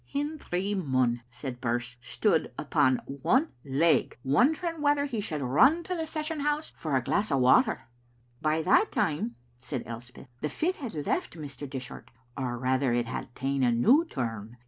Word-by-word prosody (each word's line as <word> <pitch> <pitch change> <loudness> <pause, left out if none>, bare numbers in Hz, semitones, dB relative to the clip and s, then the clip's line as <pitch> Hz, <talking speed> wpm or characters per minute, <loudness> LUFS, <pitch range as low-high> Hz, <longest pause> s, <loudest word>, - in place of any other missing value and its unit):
"Hendry 280 - -2
Munn," 130 -9 +1
said 125 0 -7
Birse, 120 0 -2
"stood 120 - +1
upon 130 -1 +2
one 235 - +1
leg, 145 +4 +2
wondering 310 - +2
whether 290 -1 +3
he 250 -6 -3
should 155 -8 -3
run 265 - +4
to 365 - -3
the 325 -2 -3
session 310 0 -3
house 295 +2 -1
for 155 -4 -2
a 130 - +2
glass 205 - 0
of 135 - +3
water." 125 0 +4 0.6
"But 155 - +1
by 155 +1 +1
that - - +4
time," 145 -6 0 0.2
said 125 0 -4
Elspeth, 120 +2 -10
"the 150 - -1
fit 360 - -1
had 210 - -5
left - - -1
Mr. 145 -2 -7
Dishart, 130 -2 -7 0.3
or 125 -2 -3
rather 130 +1 +1
it 120 0 +1
had 115 - -6
ta'en 135 +1 -1
a 125 -2 +4
new 240 - +5
turn. 115 - -5
140 Hz, 170 wpm, -28 LUFS, -, 0.6 s, new